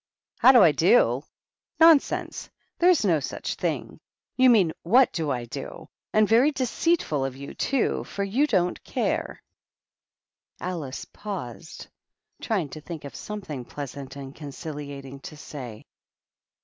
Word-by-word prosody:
" -, -, -68 dB
How -, -, +9 dB
do 245 Hz, -6 st, +7 dB
I 165 Hz, -, +7 dB
do? 145 Hz, -, +4 dB, 0.6 s
Nonsense 325 Hz, -3 st, +4 dB
I -, -, -50 dB, 0.2 s
There 350 Hz, -, +5 dB
is 345 Hz, -11 st, +4 dB
no 165 Hz, -5 st, +3 dB
such 135 Hz, -, -4 dB
thing -, -, -3 dB
I -, -, -11 dB
You 260 Hz, -, +8 dB
mean, 195 Hz, -9 st, +4 dB
what 240 Hz, +8 st, +4 dB
do 160 Hz, -3 st, -2 dB
I 125 Hz, -3 st, -2 dB
do? 115 Hz, -, -8 dB, 0.2 s
And 215 Hz, -1 st, +4 dB
very 235 Hz, +7 st, +5 dB
deceitful 260 Hz, -, 0 dB
of 135 Hz, -1 st, -3 dB
you, 140 Hz, +1 st, -8 dB
too, 275 Hz, -3 st, 0 dB
for 200 Hz, -, -4 dB
you 240 Hz, +10 st, +1 dB
don't 180 Hz, -8 st, 0 dB
care." -, -, -2 dB, 1.2 s
Alice 160 Hz, -7 st, -5 dB
paused, 175 Hz, -, -7 dB, 0.6 s
trying 195 Hz, -10 st, -1 dB
to 155 Hz, -, -9 dB
think 160 Hz, -2 st, -8 dB
of 140 Hz, -, -8 dB
something 185 Hz, -11 st, -6 dB
pleasant 140 Hz, 0 st, -8 dB
and 135 Hz, -1 st, -8 dB
conciliating 145 Hz, -2 st, -8 dB
to 150 Hz, -, -10 dB
say. 125 Hz, -8 st, -9 dB
165 Hz, 150 wpm, -25 LUFS, 140-220 Hz, 1.2 s, How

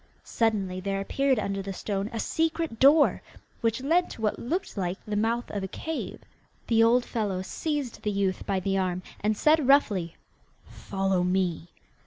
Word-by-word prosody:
Suddenly 200 Hz, -5 st, 0 dB
there 195 Hz, +1 st, -2 dB
appeared 270 Hz, +6 st, +1 dB
under 200 Hz, -2 st, -2 dB
the 195 Hz, 0 st, -5 dB
stone 200 Hz, +1 st, -3 dB
a 230 Hz, -, -4 dB
secret 320 Hz, -3 st, -1 dB
door, 290 Hz, +3 st, +5 dB, 0.4 s
which 230 Hz, +1 st, 0 dB
led 340 Hz, +5 st, +2 dB
to -, -, -9 dB
what 210 Hz, -, 0 dB
looked 340 Hz, +11 st, -3 dB
like 185 Hz, -2 st, -2 dB
the 210 Hz, -, -3 dB
mouth 230 Hz, +3 st, 0 dB
of 205 Hz, -, -3 dB
a 190 Hz, -, -3 dB
cave. 320 Hz, +10 st, -5 dB, 0.4 s
The 225 Hz, -1 st, +3 dB
old 240 Hz, +2 st, +4 dB
fellow 200 Hz, -5 st, -2 dB
seized 290 Hz, +2 st, -3 dB
the 210 Hz, -, -1 dB
youth 195 Hz, -2 st, -1 dB
by 195 Hz, -1 st, +1 dB
the 195 Hz, 0 st, 0 dB
arm, 185 Hz, -1 st, -1 dB, 0.2 s
and 215 Hz, 0 st, 0 dB
said 305 Hz, 0 st, +3 dB
roughly, 205 Hz, -, +3 dB, 0.5 s
'Follow 195 Hz, -2 st, -1 dB
me! 180 Hz, -2 st, 0 dB
210 Hz, 170 wpm, -27 LUFS, 195-255 Hz, 0.5 s, door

